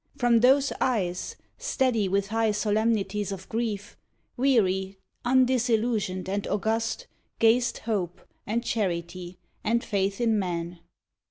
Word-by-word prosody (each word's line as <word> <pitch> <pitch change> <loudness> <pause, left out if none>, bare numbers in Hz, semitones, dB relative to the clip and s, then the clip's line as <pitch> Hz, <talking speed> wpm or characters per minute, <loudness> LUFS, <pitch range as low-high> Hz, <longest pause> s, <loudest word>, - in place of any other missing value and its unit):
From 240 -2 +4
those 270 +3 +4
eyes, 185 -8 -1 0.2
Steady 255 - +1
with 200 +1 0
high 225 0 +1
solemnities 210 -1 0
of 190 -1 -7
grief, 215 -3 -3 0.4
Weary, 195 -7 +2 0.3
undisillusioned 240 -6 +2
and 200 +1 -2
august, 225 - -1 0.3
Gazed 235 +1 +3
hope, 190 -6 -2 0.3
and 230 +3 0
charity, 180 -3 -2 0.3
and 235 +2 +1
faith 195 -1 -1
in 225 -3 +2
man. 175 -2 -3
215 Hz, 110 wpm, -27 LUFS, 190-235 Hz, 0.4 s, From